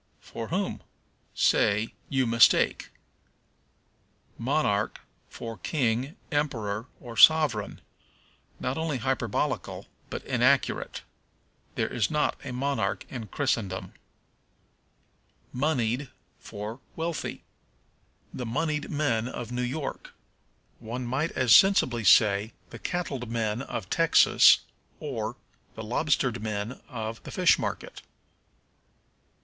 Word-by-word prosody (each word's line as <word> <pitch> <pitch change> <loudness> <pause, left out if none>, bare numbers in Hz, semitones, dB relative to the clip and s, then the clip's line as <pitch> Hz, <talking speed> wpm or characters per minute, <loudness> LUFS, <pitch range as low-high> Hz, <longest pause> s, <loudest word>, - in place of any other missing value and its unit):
For 115 -1 -7
whom? 190 +3 -2 0.5
Say, 105 +2 +2 0.2
You 130 -2 +1
mistake. 115 0 +4 1.5
Monarch - - 0 0.3
for 115 -3 -8
King, 130 - -1 0.2
Emperor, 115 -7 -1
or 120 -2 -9
Sovereign. 145 -7 +5 0.8
Not 130 +4 -2
only 160 -4 -1
hyperbolical, 125 -3 -2 0.2
but - - -6
inaccurate. - - +1 0.7
There - - 0
is 115 - 0
not 150 -1 +1
a 135 - -6
monarch 125 -6 -1
in 115 -4 -6
Christendom. 110 -7 -2 1.6
Moneyed 130 -2 0 0.3
for 105 +4 -7 0.2
Wealthy. 165 -1 -4 0.9
"The 125 - -5
moneyed 150 +5 -1
men 125 -7 0
of 120 -2 -6
New 125 0 -2
York." 135 +4 -4 0.6
One 120 +3 -5
might 135 +7 -1
as 125 -4 +5
sensibly 130 - +4
say, 105 +1 +5 0.2
"The - - -9
cattled 140 -9 -3
men 115 0 -1
of 110 -7 -5
Texas," 165 0 +6 0.4
or, - - -4 0.4
"The 110 - -6
lobstered 125 0 0
men 110 +3 -4
of 115 -3 -5
the - - -10
fish - - +3
market." - - -5
125 Hz, 100 wpm, -27 LUFS, 110-145 Hz, 1.6 s, Texas